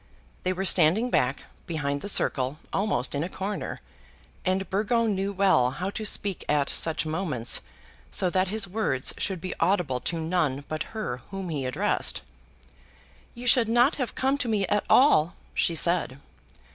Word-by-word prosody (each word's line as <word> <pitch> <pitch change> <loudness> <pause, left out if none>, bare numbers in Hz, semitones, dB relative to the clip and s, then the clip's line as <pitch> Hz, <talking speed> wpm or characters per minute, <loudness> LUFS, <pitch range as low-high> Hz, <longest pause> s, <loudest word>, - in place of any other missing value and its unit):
They 185 - 0
were 190 +1 -2
standing 190 +8 +4
back, 125 +2 +1 0.2
behind 145 -4 -2
the 205 - -2
circle, 135 -6 +2 0.2
almost 195 - 0
in 145 +1 -1
a 175 - -4
corner, 195 +2 -5 0.6
and 190 +1 0
Burgo 220 +4 +1
knew 200 -2 -1
well 190 -11 +3
how 180 +9 -4
to 215 - -5
speak 200 -2 -1
at 145 -1 +2
such 160 -1 0
moments 155 -8 0 0.5
so 185 - +2
that 185 +1 +1
his 205 +1 0
words 180 -10 0
should 190 -3 -1
be 185 +2 -5
audible 170 -8 +1
to 170 - -3
none 160 -5 -1
but 155 0 -4 0.2
her 210 - -3
whom 195 -2 -5
he 140 -5 -2
addressed. 130 - 0 1.1
"You 240 +1 -8
should 240 -2 +4
not 240 +5 +3
have 255 -4 -3
come 270 +2 +1
to 255 - 0
me 210 -3 +1
at 205 +3 0
all," 175 - +5 0.2
she 170 - +1
said. 170 -6 +2
185 Hz, 165 wpm, -26 LUFS, 155-205 Hz, 1.1 s, all